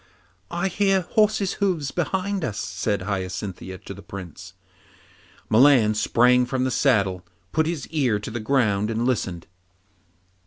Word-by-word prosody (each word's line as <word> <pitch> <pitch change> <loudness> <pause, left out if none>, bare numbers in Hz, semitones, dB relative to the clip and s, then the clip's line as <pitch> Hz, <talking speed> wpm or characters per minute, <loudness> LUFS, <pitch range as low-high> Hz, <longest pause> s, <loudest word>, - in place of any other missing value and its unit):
'I 175 +2 -1
hear 195 +1 +2
horses' 210 +2 +1
hoofs 170 -8 0
behind 190 +2 -2
us,' 105 -7 -3
said 95 +2 -2
Hyacinthia 95 -1 -4
to - - -6
the 100 - -11
Prince. 95 -1 -9 0.9
Milan 120 -2 +5
sprang 125 +3 +3
from 130 0 -1
the 130 - 0
saddle, 100 -9 +1 0.3
put 160 +8 +1
his 160 -6 -3
ear 135 -9 +1
to 105 +2 -7
the 120 - -4
ground 110 -4 +1
and 115 +1 -1
listened. 95 -9 -1
120 Hz, 140 wpm, -24 LUFS, 100-160 Hz, 0.9 s, Milan